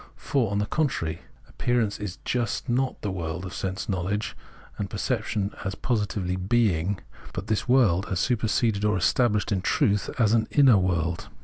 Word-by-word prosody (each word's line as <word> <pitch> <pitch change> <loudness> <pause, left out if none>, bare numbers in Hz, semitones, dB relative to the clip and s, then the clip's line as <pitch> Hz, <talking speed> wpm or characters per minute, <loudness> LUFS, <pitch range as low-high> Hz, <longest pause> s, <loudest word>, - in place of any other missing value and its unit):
For, 130 -7 0
on 100 - -1
the 105 - +1
contrary, 105 - -1 0.3
appearance 120 -4 0
is 105 -3 -5
just 120 0 -1
not 130 +1 0
the 105 - -1
world 85 0 -4
of 95 - -7
sense 95 0 -3
knowledge 100 +3 -2 0.4
and - - -2
perception 100 -1 -1
as 95 0 -3
positively 100 -6 -1
being, 95 -2 +1 0.4
but - - -4
this 110 +3 -1
world 105 -8 +4
as 95 - -1
superseded 110 -3 +1
or 105 -2 +2
established 105 +3 +2
in 95 -2 +1
truth 100 +1 +1
as 115 -3 +3
an 110 -1 +3
inner 130 -8 +6
world. 85 -2 -1
105 Hz, 165 wpm, -26 LUFS, 95-115 Hz, 0.4 s, inner